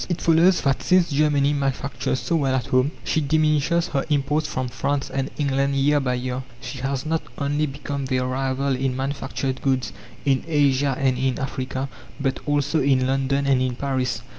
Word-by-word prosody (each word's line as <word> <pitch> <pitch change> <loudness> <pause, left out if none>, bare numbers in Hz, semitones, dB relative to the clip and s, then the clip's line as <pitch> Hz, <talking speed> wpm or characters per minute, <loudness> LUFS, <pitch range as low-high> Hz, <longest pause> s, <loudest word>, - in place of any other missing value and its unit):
It 175 - -1
follows 170 +3 +4
that 135 -2 +1
since 180 -3 +3
Germany 145 -1 +3
manufactures 135 -2 -1
so 170 - 0
well 135 -3 +1
at 130 - -1
home, 130 +2 +2
she 155 - 0
diminishes 155 +3 +2
her 135 -3 0
imports 150 +1 +1
from 130 -3 -2
France 135 +4 -2
and 135 0 -2
England 140 -1 +1
year 145 +2 +3
by 130 -2 0
year. 125 +1 -3 0.2
She 130 0 -7
has 135 +1 -2
not 160 +1 0 0.2
only 145 +1 0
become 140 0 -4
their 130 -1 0
rival 135 +1 0
in 130 0 -1
manufactured 135 -1 -3
goods 130 -2 0 0.3
in 135 -2 +2
Asia 140 -3 +2
and 130 -2 +1
in 130 -1 0
Africa, 130 0 -3 0.3
but 135 -2 -1
also 145 +2 +1
in 130 -1 +3
London 135 +1 +1
and 135 -2 +3
in 130 -1 0
Paris. 130 -2 -2
135 Hz, 180 wpm, -23 LUFS, 130-145 Hz, 0.3 s, follows